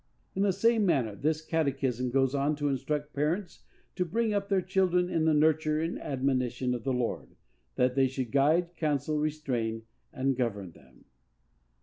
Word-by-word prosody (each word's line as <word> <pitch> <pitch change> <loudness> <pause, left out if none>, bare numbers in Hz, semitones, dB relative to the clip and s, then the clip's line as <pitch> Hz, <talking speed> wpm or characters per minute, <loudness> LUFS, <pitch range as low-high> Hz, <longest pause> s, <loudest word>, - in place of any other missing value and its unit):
In 195 - -2
the 200 -1 +3
same 225 +4 +2
manner, 135 - +1
this 155 +8 -1
catechism 135 -6 0
goes 135 +1 +2
on 140 +2 +1
to 145 0 -1
instruct 145 +2 -2
parents 165 +7 -2 0.4
to 180 - +1
bring 220 +5 0
up 200 -1 -1
their 195 -1 +3
children 180 -1 +1
in 160 -1 +1
the 160 - +4
nurture 155 0 +2
and 165 +2 -2
admonition 130 -2 -1
of 120 -2 -4
the 135 - -1
Lord, 125 -2 -3 0.4
that 125 0 +2
they 135 0 +3
should 130 -3 -4
guide, 160 +5 +2
counsel, 150 -1 0
restrain 125 -7 -2 0.3
and 135 -1 0
govern 105 -7 -2
them. - - -21
145 Hz, 165 wpm, -29 LUFS, 130-165 Hz, 0.4 s, the